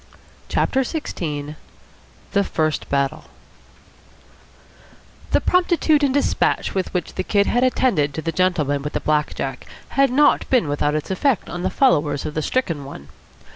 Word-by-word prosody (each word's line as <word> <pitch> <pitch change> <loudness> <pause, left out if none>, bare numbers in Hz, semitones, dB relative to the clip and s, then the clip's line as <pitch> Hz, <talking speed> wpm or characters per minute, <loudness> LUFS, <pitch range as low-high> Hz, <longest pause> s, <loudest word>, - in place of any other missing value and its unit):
CHAPTER 265 - +1
XVI 155 - -4 0.8
THE 200 -1 +2
FIRST 155 -4 -1
BATTLE 140 -1 -1 2.0
The - - +3
promptitude 345 -4 +2
and 280 - +3
despatch 285 +1 +1
with 190 -2 -2
which 180 -3 -3
the 185 - -3
Kid 200 +1 +2
had 245 - +1
attended 190 - +1
to 160 - -3
the 165 - -1
gentleman 155 -5 +1
with 150 +1 -5
the - - 0
black 150 -1 0
jack 135 -2 -5 0.2
had 275 0 +3
not 285 +4 +3
been 245 - +3
without 145 +1 0
its 155 +4 -3
effect 235 +4 0
on 175 - -5
the - - 0
followers 150 - +2
of 150 - -4
the 155 - -1
stricken 165 - -1
one. 70 - -10
175 Hz, 155 wpm, -21 LUFS, -, 2.0 s, The